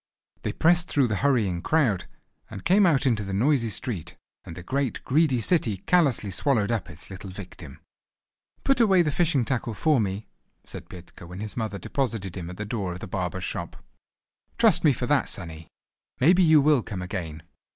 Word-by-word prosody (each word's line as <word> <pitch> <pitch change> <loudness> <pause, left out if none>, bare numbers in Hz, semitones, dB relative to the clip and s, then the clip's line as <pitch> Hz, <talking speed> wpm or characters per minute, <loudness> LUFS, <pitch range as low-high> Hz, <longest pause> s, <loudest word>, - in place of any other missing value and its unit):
They - - -2
pressed 175 +1 +3
through 140 -6 +1
the 105 - -1
hurrying 110 -11 +1
crowd, 130 - +1 0.4
and 95 - -9
came 195 +1 +5
out 145 -4 +2
into 115 -5 +1
the 95 -1 -4
noisy 120 +1 +2
street; 95 - -4 0.3
and 80 - -9
the 90 - -8
great, 135 +4 -2
greedy 135 -3 +2
city 115 - +1
callously 130 - +1
swallowed 110 +1 +1
up 110 -7 -2
its 75 +5 -12
little 95 +1 -8
victim. 90 -6 -10 0.8
"Put 275 -2 +2
away 195 -6 +5
the 150 - 0
fishing 150 -6 +1
tackle 120 -3 -2
for 155 0 +2
me," 100 +1 -3 0.4
said - - -10
Petka, 90 -1 -12
when 90 +2 -9
his 105 0 -6
mother 110 -4 -3
deposited 100 -2 -3
him 90 -3 -6
at 90 - -9
the 105 - -4
door 100 -5 -3
of 90 - -8
the - - -7
barber's 90 0 -4
shop. - - -4 0.8
"Trust - - +4
me 155 - +6
for 125 -1 -3
that, 145 -1 +1
sonny! 80 -3 -7 0.5
Maybe 175 +8 +5
you 160 -4 +6
will 145 -2 +4
come 95 -5 -6
again." 85 -5 -6
110 Hz, 185 wpm, -25 LUFS, 95-145 Hz, 0.8 s, me